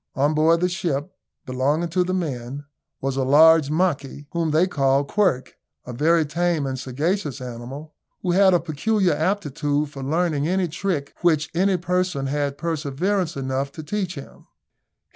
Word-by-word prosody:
On 145 +3 +2
board 160 +2 +3
the 180 - +3
ship, 175 -7 -3 0.3
belonging 140 +6 0
to 180 +2 +1
the 180 - -3
men, 140 -6 -3 0.4
was 135 0 -2
a 135 - +1
large 155 +2 +6
monkey, 150 -4 -1
whom 170 -2 -1
they 155 +4 +3
called 140 -4 +1
Quirk, 175 -12 +1 0.3
a 125 - -7
very 160 +5 +3
tame 165 0 0
and 130 -1 -3
sagacious 145 +3 -2
animal, 125 +5 -8 0.3
who 180 - +1
had 190 0 +5
a - - +4
peculiar 180 +4 0
aptitude 150 -4 -1
for 140 - -8
learning 155 +1 0
any 185 +1 +1
trick 165 -3 -3
which 160 -3 +2
any 190 +2 +2
person 180 -5 -1
had 140 0 -2
perseverance 165 +3 -1
enough 135 +1 -2
to 155 - -8
teach 185 +1 -3
him. 140 - -11
155 Hz, 160 wpm, -23 LUFS, 140-175 Hz, 0.4 s, large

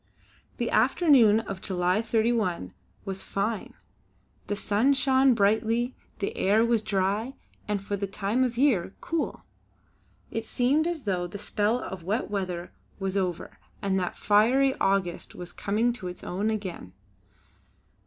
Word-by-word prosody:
The 235 - -1
afternoon 240 - +5
of 195 -4 -7
July 180 +1 +1
31 220 - 0 0.3
was 195 -1 -3
fine. 200 +3 -3 0.7
The 205 - -1
sun 215 +7 +2
shone 265 -1 +4
brightly; 225 +4 +1 0.2
the 200 - -3
air 215 +4 +3
was 230 -2 +2
dry 205 +6 -1 0.3
and, 210 -1 0
for 200 +1 -3
the 200 0 -3
time 205 +5 0
of 245 -2 -1
year, 240 -10 +2
cool. 335 -2 -3 0.9
It 225 0 -4
seemed 280 +8 +2
as 340 -5 -3
though 180 -4 -1
the 190 - -7
spell 210 +3 0
of 190 -6 -6
wet 205 +6 -2
weather 180 -3 -3 0.3
was 195 -1 -2
over 180 -3 -2 0.2
and 195 -1 0
that 180 - -3
fiery 245 +7 +4
August 195 -3 0
was 175 -1 -8
coming 225 +4 0
to 215 -7 -7
its 180 - -7
own 200 +4 -1
again. 190 - -5
210 Hz, 145 wpm, -27 LUFS, 190-240 Hz, 0.9 s, afternoon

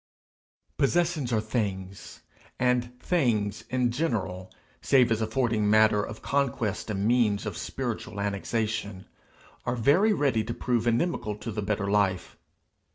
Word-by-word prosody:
Possessions 165 -3 +1
are 110 - +2
Things, 100 -4 -4 0.4
and 125 0 0
Things 110 - 0
in 125 -1 +1
general, 110 - -2 0.3
save 125 -3 +4
as 110 0 +1
affording 110 -2 +1
matter 110 -1 +5
of 110 +1 -7
conquest 125 -7 -1
and 100 -1 -1
means 115 -3 +2
of - - -4
spiritual 100 - -4
annexation, 105 0 -2 0.6
are 120 - -1
very 145 - +4
ready 135 - +1
to 115 +2 -5
prove 120 -2 0
inimical 115 -3 0
to 115 +2 -6
the 105 0 -3
better 100 0 -1
life. 100 -3 0
110 Hz, 130 wpm, -27 LUFS, 105-125 Hz, 0.6 s, matter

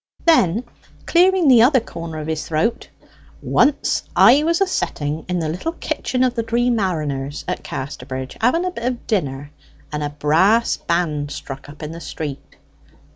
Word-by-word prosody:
Then 230 - +4 0.4
clearing 360 -1 +4
the 250 -4 +7
other 260 +3 +5
corner 165 -7 -7
of 155 - -5
his 155 -1 -3
throat: 180 +9 -1 0.5
"Once 290 0 +2
I 275 +4 +7
was 335 +2 +1
a 390 - +4
setting 155 - -2
in 180 - 0
the 165 -2 -1
little 180 - -3
kitchen 275 -6 -2
of 255 -1 +2
the 235 - -1
Dree 235 +2 +1
Mariners 150 - -2
at - - -3
Casterbridge, 130 0 -6
having 295 +10 +2
a 365 - -1
bit 235 -9 -6
of 250 -1 -2
dinner, 145 - -2 0.4
and 150 0 -3
a 145 - -1
brass 165 +11 +2
band 155 -4 -1
struck 135 -1 -8
up 150 +1 -11
in 150 - -5
the 165 +1 -8
street. 145 -5 -7
175 Hz, 170 wpm, -20 LUFS, 150-250 Hz, 0.5 s, the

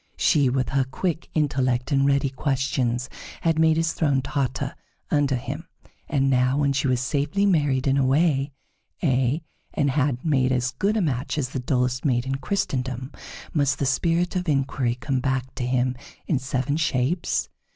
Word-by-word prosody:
She, 140 -4 +3
with 130 0 0
her 135 -1 +2
quick 165 +6 -3
intellect 130 -4 +1
and 140 0 +3
ready 140 -1 +2
questions, 130 -2 -1 0.3
had 165 -1 +1
made 160 0 +4
his 165 0 +1
throne 140 -5 +1
totter 135 -4 -2 0.4
under 145 -2 +2
him; 145 +7 -5 0.4
and 135 -2 +2
now, 130 0 +2
when 140 -1 +2
she 135 +1 0
was 125 -1 +2
safely 145 +9 0
married 145 -8 +2
and 135 0 +3
away 140 +1 +2 0.5
ay, 135 +1 +1 0.3
and 140 -2 +2
had 140 -2 0
made 130 -4 +2
as 125 0 +1
good 210 +2 0
a - - +2
match 140 -3 -1
as 135 -5 -1
the 130 - -4
dullest 125 0 0
maid 125 -4 +1
in 135 - -2
Christendom, 130 -5 -2 0.4
must 140 -3 +2
the 140 - -1
spirit 170 +7 +1
of 180 -2 -1
inquiry 135 -4 0
come 130 +1 -2
back 130 0 -1
to 125 -2 -3
him 125 0 +1 0.3
in 145 - +1
seven 130 +2 -1
shapes? 155 +2 0
135 Hz, 170 wpm, -24 LUFS, 130-150 Hz, 0.5 s, made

